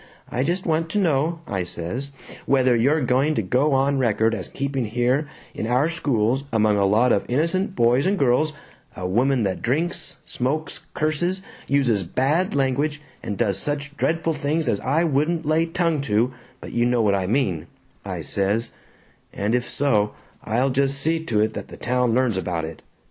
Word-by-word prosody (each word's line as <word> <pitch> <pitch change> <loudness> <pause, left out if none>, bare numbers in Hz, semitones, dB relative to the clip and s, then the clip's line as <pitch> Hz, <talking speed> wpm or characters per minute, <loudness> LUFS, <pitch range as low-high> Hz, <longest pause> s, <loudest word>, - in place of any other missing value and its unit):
I 125 - 0
just 175 +6 -1
want 165 0 0
to 210 - -2
know,' 165 -2 +1
I 95 - -2
says, 90 +10 -4 0.4
'whether 130 -2 +4
you're 140 +7 +3
going 135 +4 +2
to 110 - 0
go 130 +10 +2
on 135 +1 +2
record 115 -2 +2
as 95 -5 -4
keeping 135 -2 -2
here 125 +6 +1 0.3
in 110 - -4
our 125 +6 +2
schools, 135 -6 0
among 110 -2 +3
a 100 - +3
lot 115 +5 +3
of 100 - +2
innocent 170 +9 0
boys 120 +7 +3
and 200 +1 +1
girls, 140 +2 +2 0.5
a 90 - -3
woman 125 +5 +2
that 95 -2 -2
drinks, 155 +8 -1
smokes, 150 +6 -2 0.2
curses, 175 +5 0 0.2
uses 130 -7 +2
bad 140 - 0
language, 140 +2 0 0.2
and 100 - -4
does 100 -5 +1
such 145 +2 -3
dreadful 165 +1 0
things 150 +1 -1
as 105 -4 +1
I 145 +7 +1
wouldn't 160 +2 +1
lay 160 +2 +2
tongue 165 -3 0
to 120 0 +1 0.3
but - - -8
you 120 0 +2
know 120 -2 +2
what 100 -2 +3
I 95 -2 0
mean,' 95 - 0 0.4
I - - -4
says, 100 +4 -1 0.6
'and 100 +3 -1
if 125 -1 0
so, 105 -7 +1 0.3
I'll 125 +5 +1
just 140 +1 +1
see 160 +3 +1
to 110 -6 +1
it 110 0 +1
that - - -6
the - - -11
town 125 -2 +1
learns 125 -6 +2
about 85 -3 -2
it.' 80 0 -9
130 Hz, 180 wpm, -23 LUFS, 110-155 Hz, 0.6 s, whether